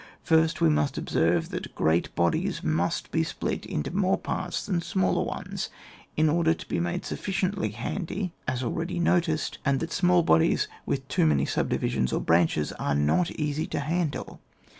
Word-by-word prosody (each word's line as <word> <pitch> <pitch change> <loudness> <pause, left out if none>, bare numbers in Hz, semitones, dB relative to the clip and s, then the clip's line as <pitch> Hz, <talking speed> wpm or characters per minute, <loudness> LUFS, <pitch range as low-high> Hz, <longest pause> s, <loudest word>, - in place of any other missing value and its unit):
First 160 -1 +3
we 80 - +5
must 75 -1 +1
observe, 85 0 +1
that - - -6
great 80 +2 +1
bodies 85 -1 0
must 80 +3 0
be - - +2
split - - -3
into 75 - -3
more 190 -1 +2
parts 180 - -3
&an 180 -4 0
smaller 95 - +1
ones, - - -4 0.5
in 155 +1 +4
order 165 +1 +3
to - - -11
be - - -1
made 175 +1 -2
sufficiently 190 - -1
handy 175 - -4
(as 130 0 -1
already 170 +9 -2
noticed), 170 -3 +1
and 140 -1 +2
that 165 - -4
small 180 -1 +3
bodies 80 - +3 0.2
with - - -2
too - - +2
many 70 -2 +3
subdivisions 65 - 0
or - - +1
branches 80 -3 +2
are 70 - 0
not 75 - +2
easy 150 0 -2
to - - -2
handle. 155 +1 -2
155 Hz, 165 wpm, -27 LUFS, -, 0.5 s, we